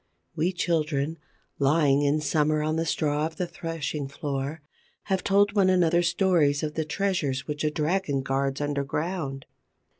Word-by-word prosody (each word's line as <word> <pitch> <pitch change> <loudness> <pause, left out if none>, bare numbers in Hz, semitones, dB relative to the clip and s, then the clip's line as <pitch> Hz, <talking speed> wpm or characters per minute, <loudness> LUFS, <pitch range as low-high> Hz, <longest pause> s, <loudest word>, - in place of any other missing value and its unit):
We 170 +3 +1
children, 160 -3 -1 0.4
lying, 140 0 +3
in 145 +1 +2
summer, 150 +1 +1
on 155 +1 0
the 165 0 -1
straw 150 0 0
of 160 - -11
the 180 - -2
threshing 165 -4 -4
floor, 140 +1 -4 0.4
have 190 -1 -1
told 200 +1 +3
one 195 -2 +4
another 175 -2 +3
stories 170 -5 +2
of 150 -1 -2
the 160 0 -2
treasures 155 -6 -1
which 150 0 -4
a 155 - +2
dragon 150 -2 0
guards 135 +1 -1
underground. 145 0 -2
155 Hz, 150 wpm, -26 LUFS, 145-170 Hz, 0.4 s, one